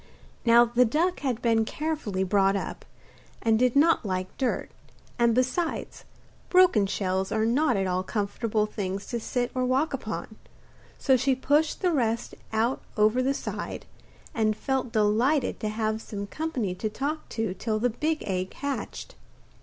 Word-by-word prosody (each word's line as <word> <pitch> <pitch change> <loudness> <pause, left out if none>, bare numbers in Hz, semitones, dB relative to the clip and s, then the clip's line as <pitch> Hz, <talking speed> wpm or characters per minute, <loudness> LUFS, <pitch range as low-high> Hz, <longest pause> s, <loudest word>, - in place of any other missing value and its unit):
Now 235 +1 +7
the 240 +1 +3
duck 325 +10 +1
had 255 -5 -2
been 225 -2 +3
carefully 275 -8 -2
brought 195 +1 +3
up, 195 - -4 0.5
and 225 -1 +2
did 250 0 +3
not 320 +2 +4
like 185 -2 -3
dirt, 260 -3 -1 0.5
and, 235 -1 +4
besides, 260 +7 -1 0.4
broken 360 - +5
shells 190 -1 -1
are 220 0 +1
not 245 0 +2
at 195 - 0
all 185 0 0
comfortable 210 +2 -1
things 200 -2 -4
to 235 - -2
sit 245 +2 -2
or 255 - 0
walk 265 +5 +1
upon; 220 -3 -5 0.6
so 265 - +3
she 265 +2 +2
pushed 295 +4 +1
the 365 -2 +2
rest 235 -6 0 0.2
out 225 +4 0 0.2
over 215 +4 +4
the 270 +2 +1
side, - - -5 0.5
and 215 -2 +1
felt 265 -3 -1
delighted 230 +7 +2
to 215 - -2
have 215 0 -1
some 200 -2 -5
company 250 - -3
to 215 +4 -3
talk 285 +8 -4
to 225 -5 -2
till 215 +2 -2
the 245 +3 +1
big 310 +7 -1
egg 185 -1 -3
hatched. 285 - -5
230 Hz, 160 wpm, -27 LUFS, 210-270 Hz, 0.6 s, Now